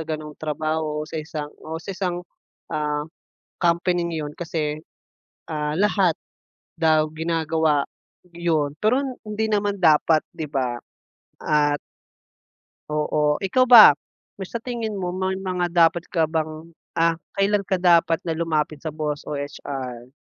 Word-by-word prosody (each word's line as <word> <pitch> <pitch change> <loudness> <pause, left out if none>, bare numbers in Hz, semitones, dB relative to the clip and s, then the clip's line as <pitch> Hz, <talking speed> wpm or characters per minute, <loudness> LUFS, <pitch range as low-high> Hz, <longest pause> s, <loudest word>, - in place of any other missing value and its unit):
sa - - -4
ganung 155 -1 -5
trabaho 155 0 -2
sa 160 - -5
isang 150 -1 -6
o 160 +1 -5
sa 195 - -5
isang, 180 -2 -3 0.5
ah, 150 -1 -1 0.6
company 175 +1 +2
na 165 - -4
yun - - -10
kasi, 155 -3 -3 0.7
ah, 150 -1 -1
lahat 195 -4 +3 0.6
daw 155 -2 +3
ginagawa 160 -2 +1 0.5
yun 160 -4 0
pero 230 +5 +3 0.2
hindi 215 +1 -2
naman 205 -1 +1
dapat 155 -1 +5 0.2
‘di 160 - -3
ba, 130 -4 -1 0.6
at 145 -1 +2 1.1
Oo. 150 0 +1
Ikaw 255 +6 +3
ba, 235 -9 +11 0.6
sa 230 +3 -6
tingin 230 -4 -3
mo 180 -2 -2
may 185 +1 -1
mga 185 -2 -1
dapat 170 0 +3
ka 165 -3 +1
bang 155 +1 -3 0.2
ah, 165 0 +2 0.2
kailan 200 0 +1
ka 190 - +2
dapat 170 -2 +3
na 165 - -2
lumapit 160 -2 -1
sa 155 0 -6
boss 150 -1 -3
o 150 - -3
HR? 135 -4 -6
160 Hz, 135 wpm, -23 LUFS, 150-180 Hz, 1.1 s, ba